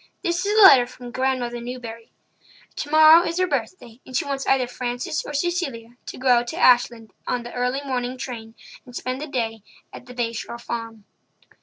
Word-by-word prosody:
This 345 +1 0
is 420 +1 +1
a 435 - +8
letter 260 -10 +8
from 245 -1 -11
Grandmother 255 -2 -1
Newbury. 235 -2 -8 0.7
Tomorrow 310 +2 +6
is 335 +1 -3
her 370 - +3
birthday, 245 -10 -4
and 255 - -4
she - - -1
wants 275 -1 -3
either 265 -2 +3
Frances 245 +3 -4
or - - -7
Cecilia 280 -8 -3
to - - -7
go 255 0 -1
out 240 -1 +4
to - - -5
Ashland 240 -3 +3
on 245 -1 -1
the 240 - -9
early 250 +2 -1
morning 255 -1 -3
train 230 -3 -7 0.3
and 245 -3 -14
spend 255 +2 -4
the 305 - -5
day 225 -5 -3 0.3
at 250 - -11
the 250 - -11
Bay 235 -1 -2
Shore 235 +1 -6
Farm." 230 -2 -6
250 Hz, 190 wpm, -23 LUFS, 235-275 Hz, 0.7 s, a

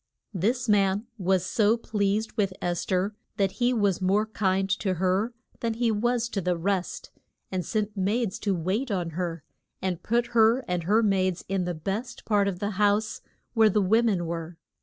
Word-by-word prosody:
This 230 +8 0
man 200 0 +2
was 185 -1 +1
so 215 +3 +3
pleased 210 -1 -1
with 200 -4 0
Es 175 -1 -2
ther 190 +3 0 0.2
that 195 -2 +2
he 240 +1 +4
was 205 -6 +1
more 195 +3 +2
kind 195 -3 0
to 190 -3 0
her 190 +6 +1 0.3
than 230 -1 -1
he 235 0 +1
was 235 +2 +1
to 200 -5 -2
the 180 -1 0
rest, 185 +1 -2 0.4
and 185 -1 -1
sent 215 +2 -2
maids 205 +2 0
to 200 -3 0
wait 190 +10 -1
on 180 -5 -1
her, 170 -2 -3 0.4
and 185 -3 -2
put 240 +1 0
her 230 +3 +4
and 180 -2 -2
her 215 +5 +3
maids 185 -3 +1
in 190 -1 -1
the 175 -1 -2
best 200 +10 -4
part 205 -2 +2
of 195 -3 -2
the 205 +3 -2
house 210 +1 +2 0.3
where 225 -2 +5
the 210 - +2
wo 220 +5 +4
men 200 -7 +1
were. 165 0 -5
200 Hz, 185 wpm, -27 LUFS, 185-220 Hz, 0.4 s, where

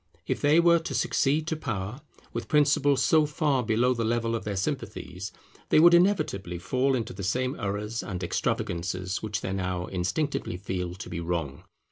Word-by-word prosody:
If - - -2
they 150 +3 +5
were 170 0 +5
to 165 - -5
succeed 150 +3 +1
to 160 - -1
power, 115 -3 -4 0.3
with - - -4
principles 145 -2 +3
so 155 -2 +4
far 150 -3 +1
below 120 +2 +2
the 115 -2 -2
level 115 0 0
of 115 - -3
their 105 -1 -2
sympathies, 100 -5 -4 0.4
they - - +5
would 170 +2 +8
inevitably 170 - +2
fall 130 +9 +1
into 115 -4 -3
the 95 - -7
same 125 +7 0
errors 105 +3 -3
and 90 -2 -5
extravagances 90 +2 -2
which 105 -1 -3
they 95 - -3
now 90 -2 -2
instinctively 95 - -2
feel 90 -2 -4
to 95 - -8
be 85 - -5
wrong. 85 -5 -3
110 Hz, 175 wpm, -27 LUFS, 95-145 Hz, 0.4 s, would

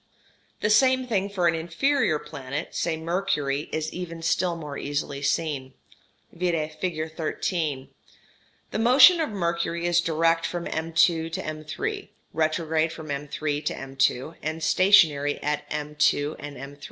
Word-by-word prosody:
] - - -37
The 210 - +2
same 260 +3 +4
thing 200 -5 0
for 185 -4 +1
an 165 - +3
inferior 170 - +1
planet, 145 0 -6
say 165 -2 -1
Mercury, 160 -4 -1
is 155 0 -3
even 170 -2 -6
still 175 +1 +1
more 150 -4 -7
easily 140 -1 -3
seen 140 -3 -1 0.6
(vide 165 -3 -1
figure 160 -4 -2
13). 155 -3 -2 0.8
The - - -2
motion 260 +10 +7
of 315 - -1
Mercury 170 -3 -2
is 175 0 +3
direct 165 0 +2
from 175 -1 -4
M'' 160 +1 -4
to 165 -2 -2
M''', 155 -1 -4 0.2
retrograde 160 0 +1
from 155 -2 -7
M''' 140 +1 -4
to 150 +1 -2
M'', 135 +2 -1
and 160 +1 -4
stationary 155 -5 +4
at 150 0 -2
M'' 150 0 -4 0.4
and 145 -1 -8
M'''. 140 +2 -9
160 Hz, 140 wpm, -25 LUFS, 150-175 Hz, 0.8 s, motion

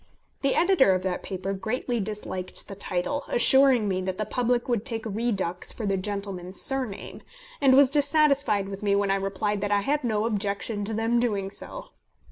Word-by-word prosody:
The 275 -1 +1
editor 335 - +4
of 185 - -2
that 185 -1 -2
paper 190 0 -4
greatly 235 +4 -2
disliked 200 -3 -4
the - - -7
title, 200 +8 -2
assuring 260 -3 +4
me 185 -1 -1
that 185 0 -3
the 215 - -2
public 245 +1 0
would 235 -4 0
take 230 -3 -3
Redux 200 -5 -2
for 225 - -5
the 195 -1 +1
gentleman's 190 -2 -4
surname, 260 -7 -2 0.4
and 265 -2 +6
was 275 -1 +6
dissatisfied 285 -8 +2
with 195 0 -7
me 200 -1 +2
when 200 -1 +1
I - - +3
replied 195 +1 -2
that 205 0 -2
I 205 0 +3
had 290 +7 0
no 215 -3 0
objection 205 0 -2
to 220 +1 -2
them 225 +2 +1
doing 200 -5 -1
so. - - -7
210 Hz, 185 wpm, -26 LUFS, 195-250 Hz, 0.4 s, and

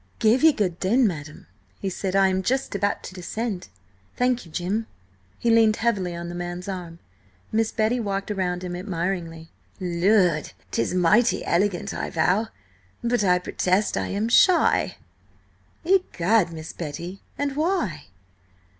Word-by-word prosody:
"Give 225 +4 +3
ye 320 - +8
good 185 - -1
den, 235 +7 +3
madam," 155 -6 -4 0.3
he 195 - -3
said. 190 +1 -3
"I 195 0 +5
am 190 0 0
just 260 +6 -1
about 200 0 -1
to - - -8
descend. 195 +2 -4 0.5
Thank 250 -5 +1
you, - - -16
Jim." 200 +7 -2 0.5
He 235 - +1
leaned 225 -2 +5
heavily 200 -7 0
on 170 0 -5
the 175 - -6
man's 175 +1 -5
arm. 175 -4 -6 0.5
Miss 225 0 +1
Betty 225 +2 +1
walked 200 -2 -2
round 180 -3 -2
him 180 -1 -4
admiringly. 170 -3 -4 0.3
"Lud! 180 -2 +2 0.2
'Tis 115 +10 0
mighty 210 +7 +3
elegant, 180 +1 0
I - - -3
vow! 180 +7 +1 0.6
But 235 -2 +1
I 180 -2 +4
protest, 185 +2 0
I - - -1
am 205 +3 -1
shy!" 345 +9 +4 0.9
"Egad, 225 - +2
Miss 160 0 -8
Betty! 170 +4 -6 0.2
and 280 -1 -2
why?" 305 - -1
190 Hz, 145 wpm, -24 LUFS, 175-225 Hz, 0.9 s, ye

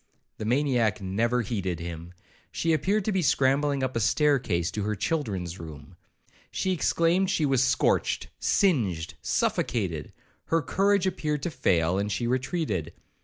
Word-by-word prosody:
The 110 - -4
maniac 120 -4 +1
never 115 +6 0
heeded 95 -6 -3
him; 85 +1 -7 0.4
she 165 -1 0
appeared 190 +7 +1
to 215 - +1
be 190 -2 +1
scrambling 140 -1 +2
up 130 -1 -2
a - - +1
stair 140 +5 +3
case 85 -7 -1
to 105 - -3
her 105 +1 -1
children's 95 - -2
room. 80 +1 -10 0.5
She 190 - -1
exclaimed 180 +1 +2
she 160 - +1
was 135 -2 +3
scorched, 130 - +1
singed, 105 - +1
suffocated; - - -1 0.3
her 165 -1 +1
courage 195 +6 +2
appeared 150 -6 -2
to 175 - -2
fail, 85 - +1
and 105 +1 -2
she 120 - -1
retreated. 125 - -1
125 Hz, 150 wpm, -27 LUFS, 95-155 Hz, 0.5 s, stair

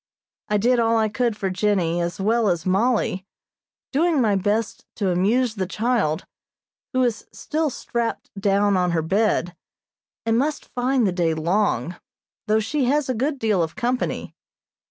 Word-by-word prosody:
I 210 - +2
did 240 +4 +3
all 230 0 +3
I 220 -1 +2
could 230 0 -1
for 195 -3 -2
Jennie 185 -3 +1
as 170 0 -3
well 220 +2 +2
as 170 -3 -1
Mollie, 195 0 +1 0.7
doing 320 +2 +2
my 215 -5 +3
best 210 +3 -1
to 195 -4 0
amuse 215 +7 +2
the 190 -4 -3
child, 215 -7 0 0.7
who 255 -2 +2
is 235 -3 -1
still 310 0 -2
strapped 235 -2 -3
down 200 0 +2
on 180 -2 +1
her 165 -2 +1
bed, 190 -1 +1 0.7
and 225 0 +2
must 295 +3 -2
find 250 0 +1
the 190 - +2
day 170 -3 0
long, 170 - 0 0.5
though 215 +1 +3
she 260 +6 0
has 280 +2 +1
a - - +2
good 275 +5 -1
deal 215 -7 +1
of 165 -1 -2
company. 250 0 -2
215 Hz, 160 wpm, -23 LUFS, 185-245 Hz, 0.7 s, did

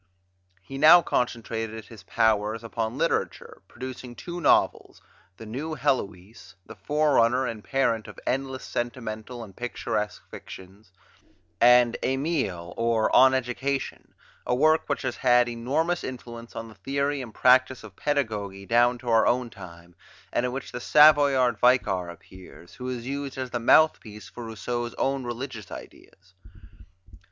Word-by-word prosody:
He 135 +5 -8
now 170 +4 +8
concentrated 115 -2 -3
his 115 -3 -13
powers 110 +3 0
upon 115 +1 -4
literature, 165 +2 -2
producing 125 +1 -8
two 175 +5 -7
novels, - - +2 0.4
"La 110 - -9
Nouvelle 145 +9 -5
Heloise," 110 -8 -3
the - - -11
forerunner 130 -4 +2
and 110 -4 -5
parent 115 -5 0
of - - -11
endless 130 0 -2
sentimental 120 0 -5
and 100 -4 -13
picturesque 105 -3 -4
fictions; 95 +2 -12 0.7
and 120 0 +5
"Emile, 130 - -2
ou 115 -1 +2
l'Education," 130 +1 +1 0.3
a 125 - +1
work 155 +4 +2
which 145 - -2
has 130 -2 -3
had 125 -1 +4
enormous 145 +9 -1
influence 120 -2 -8
on 115 - -6
the 110 - -13
theory 140 +4 -2
and 120 -4 -10
practise 130 0 +3
of 105 -3 -12
pedagogy 105 -10 -2
down 120 +3 +3
to 120 0 -14
our 115 -1 +4
own 125 -1 0
time 85 -2 -13 0.4
and 125 - +1
in - - -4
which 135 +1 -6
the 125 - -6
Savoyard 140 -6 +5
Vicar 95 -8 +2
appears, 85 -1 -14
who 125 0 -6
is 120 -2 -5
used 140 +1 -5
as 130 -1 -5
the 120 - -2
mouthpiece 115 -5 +2
for 120 - -9
Rousseau's 120 +2 -4
own 135 -1 -1
religious 120 -2 -6
ideas. 95 -1 -13
120 Hz, 140 wpm, -25 LUFS, 110-135 Hz, 0.7 s, now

